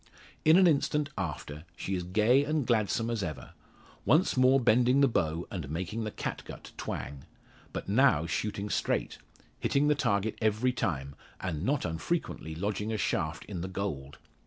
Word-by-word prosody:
In 160 Hz, +2 st, +7 dB
an 190 Hz, -, +6 dB
instant 150 Hz, -2 st, +2 dB
after, 75 Hz, -4 st, -5 dB
she 95 Hz, -, -3 dB
is 90 Hz, -, 0 dB
gay 110 Hz, +9 st, +3 dB
and 150 Hz, -2 st, 0 dB
gladsome 115 Hz, 0 st, +1 dB
as 115 Hz, -3 st, -1 dB
ever; 75 Hz, -9 st, -5 dB, 0.5 s
once 155 Hz, -, +3 dB
more 130 Hz, +1 st, +5 dB
bending 125 Hz, +2 st, +4 dB
the 140 Hz, -, +6 dB
bow, 85 Hz, -7 st, -1 dB
and 85 Hz, -9 st, -5 dB
making 95 Hz, +8 st, -3 dB
the -, -, -2 dB
catgut -, -, -6 dB
twang. 70 Hz, +1 st, -5 dB, 0.5 s
But -, -, -5 dB
now 105 Hz, -, +4 dB
shooting 105 Hz, +3 st, -2 dB
straight -, -, -1 dB, 0.4 s
hitting 145 Hz, +1 st, +2 dB
the -, -, +6 dB
target 105 Hz, -6 st, 0 dB
every 110 Hz, +4 st, +2 dB
time, 70 Hz, -, -2 dB, 0.3 s
and 85 Hz, -5 st, -3 dB
not 135 Hz, -, 0 dB
unfrequently 80 Hz, -, -3 dB
lodging 105 Hz, +4 st, -2 dB
a 110 Hz, -, -1 dB
shaft -, -, -1 dB
in 95 Hz, -5 st, -5 dB
the 90 Hz, -, -3 dB
"gold." 80 Hz, -8 st, -4 dB
105 Hz, 160 wpm, -30 LUFS, 85-130 Hz, 0.5 s, In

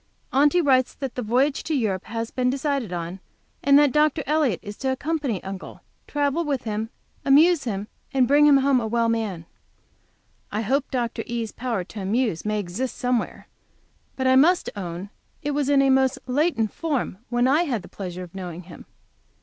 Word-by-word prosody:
Aunty 295 Hz, +6 st, +4 dB
writes 260 Hz, -4 st, +2 dB
that 270 Hz, -3 st, -5 dB
the 250 Hz, -, -3 dB
voyage 255 Hz, +6 st, +1 dB
to 315 Hz, -, -2 dB
Europe 205 Hz, -8 st, -1 dB
has 230 Hz, +1 st, -4 dB
been 250 Hz, -1 st, 0 dB
decided 275 Hz, -, -1 dB
on, 175 Hz, +1 st, -4 dB, 0.4 s
and 280 Hz, +1 st, +5 dB
that 290 Hz, -2 st, +5 dB
Dr. 300 Hz, +1 st, +2 dB
Elliott 290 Hz, -, +1 dB
is 205 Hz, 0 st, -7 dB
to 265 Hz, -1 st, -1 dB
accompany 280 Hz, -, -2 dB
Uncle, 195 Hz, 0 st, -8 dB, 0.3 s
travel 290 Hz, +3 st, 0 dB
with 280 Hz, -5 st, -2 dB
him, 220 Hz, 0 st, -3 dB, 0.3 s
amuse 300 Hz, +3 st, +5 dB
him, 205 Hz, -3 st, -3 dB, 0.2 s
and 265 Hz, -3 st, +3 dB
bring 290 Hz, +3 st, +5 dB
him 285 Hz, -2 st, +7 dB
home 270 Hz, -1 st, +3 dB
a 225 Hz, -, -2 dB
well 230 Hz, +1 st, +1 dB
man. 210 Hz, -7 st, -2 dB, 1.1 s
I 210 Hz, -, -1 dB
hope 270 Hz, +6 st, 0 dB
Dr. 240 Hz, -3 st, -2 dB
E.'s 230 Hz, -2 st, -3 dB
power 235 Hz, -6 st, -3 dB
to 205 Hz, +3 st, -9 dB
amuse 210 Hz, -2 st, 0 dB
may 215 Hz, 0 st, 0 dB
exist 205 Hz, +7 st, -4 dB
somewhere, 250 Hz, -1 st, -2 dB, 0.7 s
but 260 Hz, -, -2 dB
must 350 Hz, +5 st, +3 dB
own 185 Hz, 0 st, -6 dB, 0.3 s
it 290 Hz, -, -1 dB
was 285 Hz, -1 st, 0 dB
in 275 Hz, -1 st, +5 dB
a 270 Hz, -, +4 dB
most 265 Hz, 0 st, +3 dB
latent 255 Hz, -4 st, 0 dB
form 285 Hz, -, -2 dB
when 240 Hz, +1 st, +2 dB
I 305 Hz, +6 st, +3 dB
had 240 Hz, -, -2 dB
the -, -, -11 dB
pleasure 185 Hz, -2 st, -6 dB
of 175 Hz, -, -12 dB
knowing 180 Hz, -2 st, -7 dB
him. 175 Hz, -, -13 dB
250 Hz, 180 wpm, -24 LUFS, 210-280 Hz, 1.1 s, him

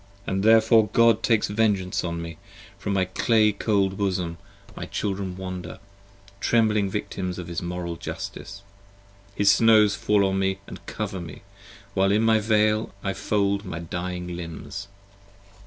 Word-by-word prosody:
And 95 Hz, 0 st, -1 dB
therefore 110 Hz, 0 st, +5 dB
God 115 Hz, +1 st, +4 dB
takes 115 Hz, -2 st, +2 dB
vengeance 105 Hz, -3 st, 0 dB
on 85 Hz, -1 st, -3 dB
me: 85 Hz, -1 st, -8 dB, 0.4 s
from 100 Hz, 0 st, -2 dB
my 95 Hz, -1 st, +2 dB
clay 105 Hz, +3 st, +2 dB
cold 100 Hz, -2 st, 0 dB
bosom 90 Hz, -4 st, -1 dB, 0.4 s
My -, -, -6 dB
children 95 Hz, -2 st, -3 dB
wander, 90 Hz, -2 st, -6 dB, 0.6 s
trembling 105 Hz, -1 st, +2 dB
victims 95 Hz, -2 st, -4 dB
of 90 Hz, -, -6 dB
his 85 Hz, -1 st, -4 dB
Moral 85 Hz, -1 st, -4 dB
Justice. 100 Hz, +4 st, -7 dB, 0.7 s
35 -, -, -27 dB
His 100 Hz, -1 st, +5 dB
snows 110 Hz, -2 st, +5 dB
fall 105 Hz, -2 st, +2 dB
on 95 Hz, 0 st, 0 dB
me 95 Hz, 0 st, 0 dB
and -, -, -10 dB
cover 100 Hz, -4 st, -4 dB
me, 85 Hz, +1 st, -10 dB, 0.5 s
while 95 Hz, 0 st, +2 dB
in 110 Hz, +2 st, +3 dB
the 110 Hz, -1 st, +4 dB
Veil 110 Hz, 0 st, +2 dB
I 95 Hz, -, -1 dB
fold 100 Hz, -1 st, 0 dB
My 90 Hz, -5 st, -6 dB
dying 90 Hz, +1 st, -5 dB
limbs. 85 Hz, +3 st, -7 dB
100 Hz, 150 wpm, -25 LUFS, 90-105 Hz, 0.7 s, therefore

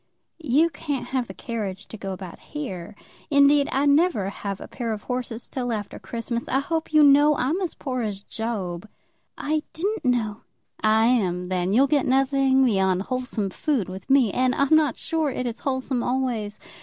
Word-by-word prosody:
"You 315 Hz, +2 st, +2 dB
can't 285 Hz, -2 st, -4 dB
have 255 Hz, -3 st, -1 dB
the 190 Hz, -, -8 dB
carriage 205 Hz, -6 st, -5 dB
to -, -, -8 dB
go 195 Hz, -2 st, -5 dB
about 185 Hz, -2 st, -8 dB
here. 210 Hz, -, -7 dB, 0.3 s
Indeed, 280 Hz, 0 st, +5 dB
I 275 Hz, +2 st, +1 dB
never 285 Hz, -, +3 dB
have 200 Hz, -1 st, -5 dB
a -, -, -8 dB
pair 235 Hz, -3 st, -4 dB
of 210 Hz, -, -7 dB
horses 245 Hz, -2 st, -4 dB
till 245 Hz, -2 st, -3 dB
after 210 Hz, -3 st, -4 dB
Christmas. 235 Hz, +1 st, -4 dB
I 265 Hz, -, +1 dB
hope 320 Hz, +4 st, -2 dB
you 305 Hz, -1 st, +6 dB
know 290 Hz, +1 st, +6 dB
that -, -, -2 dB
I'm 305 Hz, +10 st, 0 dB
as 355 Hz, -4 st, -2 dB
poor 255 Hz, -3 st, -3 dB
as 205 Hz, -3 st, -4 dB
Job." 210 Hz, -5 st, -4 dB, 0.5 s
"I 305 Hz, +1 st, 0 dB
didn't 400 Hz, +5 st, -2 dB
know." 230 Hz, -5 st, 0 dB, 0.4 s
"I 220 Hz, +1 st, +4 dB
am, 185 Hz, -7 st, +1 dB
then. 180 Hz, 0 st, -1 dB
You'll 255 Hz, +7 st, +5 dB
get 280 Hz, -1 st, +1 dB
nothing 270 Hz, 0 st, +3 dB
beyond 190 Hz, -5 st, +2 dB
wholesome 250 Hz, -5 st, -3 dB
food 250 Hz, -, -1 dB
with 190 Hz, +5 st, -9 dB
me. 265 Hz, -6 st, +5 dB
And 255 Hz, 0 st, +2 dB
I'm 280 Hz, +3 st, +4 dB
not 305 Hz, -5 st, +3 dB
sure 320 Hz, -2 st, -1 dB
it 255 Hz, -1 st, -3 dB
is 235 Hz, -2 st, -3 dB
wholesome 260 Hz, -2 st, -1 dB
always. 240 Hz, -5 st, -1 dB
250 Hz, 185 wpm, -24 LUFS, 210-280 Hz, 0.5 s, you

